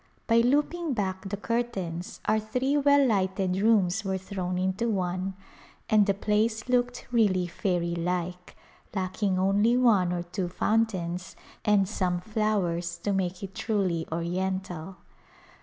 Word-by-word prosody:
By 230 - +3
looping 295 +6 +2
back 190 -2 -2
the 205 - -3
curtains 195 -7 -3
our 215 +1 +3
three 250 +6 -1
well 285 -1 +5
lighted 190 -3 +1
rooms 205 -2 +3
were 190 -1 -1
thrown 185 -1 -4
into 190 +5 0
one 185 -1 -1 0.6
and 210 -1 +5
the 200 - +2
place 215 +3 0
looked 245 0 0
really 200 -6 +3
fairy 175 -1 -1
like, 180 +1 -3 0.4
lacking 190 0 0
only 200 +5 +3
one 210 -8 +4
or 175 -1 -2
two 175 +1 -3
foun 225 +5 +2
tains 180 -3 -5 0.3
and 205 -3 +3
some 180 -3 -1
flowers 180 -4 -1
to 205 - 0
make 185 -1 -2
it 195 -1 -6
truly 185 -7 -1
oriental. 185 +1 -3
195 Hz, 140 wpm, -27 LUFS, 180-220 Hz, 0.6 s, well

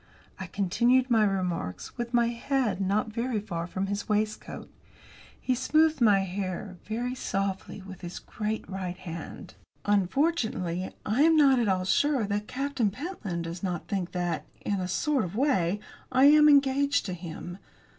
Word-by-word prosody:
I 190 - -5
continued 240 +8 +2
my 225 -2 +5
remarks 180 - -2
with 240 -1 -4
my 235 -1 +3
head 235 -4 -1
not 210 +3 0
very 235 -1 -1
far 175 -5 -4
away 180 - -13
from 190 +1 -1
his 200 +2 -4
waistcoat. 215 0 -2 0.7
He 255 - 0
smoothed 310 +3 +2
my 205 -4 +5
hair, 185 0 -4
very 240 +3 -2
softly, 195 -4 -3
with 190 -1 -10
his 175 -1 -6
great 215 0 -4
right 185 -2 -4
hand. 170 -3 -8 0.3
"Unfortunately, 205 - 0 0.2
I 220 +6 +1
am 325 +1 +6
not 275 -4 +6
at 235 - +1
all 185 -2 +1
sure 270 +4 +2
that 205 +1 -2
Captain 270 -4 -1
Pentland 210 - -5
does 170 +1 -6
not 180 -4 -3
think 190 -3 -2
that, 175 -1 -2
in 200 -2 -1
a 180 - -2
sort 275 - +1
of 180 +2 -5
way, 210 - +1 0.3
I 260 +1 +4
am 300 +1 +8
engaged 280 0 +3
to 185 - -3
him. 175 +1 -7
205 Hz, 165 wpm, -28 LUFS, 185-255 Hz, 0.7 s, am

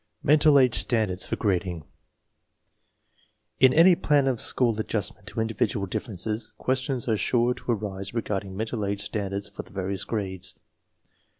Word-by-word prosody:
n - - -4
MENTAL 150 -1 +6
AGE 130 -4 +4
STANDARDS 110 -6 +1
FOR - - -1
GRADING 90 -5 -1 1.8
In 130 -1 +7
any 170 +6 +7
plan 145 -4 +2
of 130 -4 0
school 115 -4 +1
adjustment 100 -2 -2
to - - -5
individual 110 -1 -1
dif 95 - -4
ferences 110 +2 -3
questions 130 -1 -1
are 115 - +2
sure 120 +3 +2
to 125 - -4
arise 100 -3 -3
regarding 100 -4 -3
mental 110 0 -2
age 100 0 -2
standards 100 -1 -3
for - - -8
the - - -18
various 95 0 -3
grades. 95 -4 -4
110 Hz, 155 wpm, -26 LUFS, 100-125 Hz, 1.8 s, In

